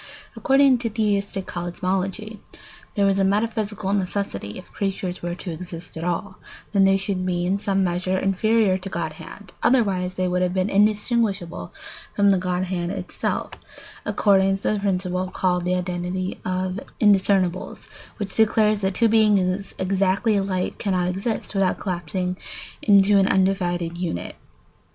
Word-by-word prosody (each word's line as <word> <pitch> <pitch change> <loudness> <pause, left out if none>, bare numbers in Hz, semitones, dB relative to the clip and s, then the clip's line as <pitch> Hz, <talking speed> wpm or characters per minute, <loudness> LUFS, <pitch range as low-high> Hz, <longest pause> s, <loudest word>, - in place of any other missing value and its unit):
According 270 -2 +4
to 230 -1 -2
theistic 200 -3 -1
cosmology, 190 +4 -3 0.6
there 200 -2 +3
was 195 0 +2
a - - +3
metaphysical 210 -1 0
necessity, 185 - -2
if - - -12
creatures 190 -2 -3
were 175 0 -3
to 180 0 -5
exist 170 +1 -8
at 160 - -5
all, 180 +2 -3 0.3
that 200 -2 +4
they 195 0 +4
should 195 -1 -2
be 175 -1 -1
in 195 +2 0
some 195 -2 +1
measure 185 +1 0
inferior 195 +1 +2
to 190 +1 -7
godhead; 170 +3 -6
otherwise 190 -7 +2
they 185 0 0
would 180 0 0
have 180 0 0
been 185 +2 0
indistinguishable 205 - +1 0.4
from 200 0 +4
the 190 - +3
godhead 180 -1 -2
itself 185 -1 -3 0.5
according 195 -1 +3
to 195 - -1
the 210 - 0
principle 185 -2 -1
called 180 -1 0
the 180 0 +1
identity 180 +1 -3
of 185 +1 -2 0.2
indiscernibles, 195 -3 +2 0.3
which 200 -3 -4
declares 215 -1 +3
that 190 -1 -1
two 230 - +4
beings 205 -3 +2
exactly 195 +3 +1
alike 195 -2 -1
cannot 185 -3 0
exist 195 +6 -3
without 195 -2 +1
collapsing 180 0 -3 0.4
into 200 0 +5
an 195 - +3
undivided 175 -3 0
unit. 170 - -4
190 Hz, 145 wpm, -23 LUFS, 180-200 Hz, 0.6 s, into